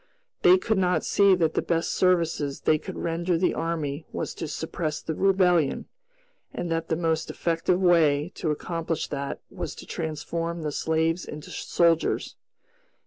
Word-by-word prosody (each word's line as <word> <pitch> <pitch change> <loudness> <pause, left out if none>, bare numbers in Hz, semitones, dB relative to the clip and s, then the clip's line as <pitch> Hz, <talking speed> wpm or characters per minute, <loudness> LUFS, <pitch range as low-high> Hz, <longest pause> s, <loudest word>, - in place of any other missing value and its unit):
They 180 +1 +7
could 210 +2 0
not 180 -4 +1
see 200 -2 +5
that 165 -3 +1
the - - +1
best 165 -1 0
service 175 -3 +2 0.2
they 155 - +3
could - - -8
render 170 +1 0
the 180 - +2
army 155 -3 -3
was - - -4
to 165 - -5
suppress 155 0 -3
the 160 - -4
Rebellion, 180 -4 +2 0.7
and 175 -1 -4
that 165 0 -1
the 160 - 0
most 160 -1 -1
effective 170 +2 0
way 165 -3 +3
to 160 - -3
accomplish 165 +1 -2
that 140 -1 -4
was - - -5
to - - -10
transform 165 +1 -4
the 150 - -2
slaves 160 +3 0
into 150 0 -8
soldiers. 170 -2 +1
165 Hz, 155 wpm, -26 LUFS, 160-175 Hz, 0.7 s, They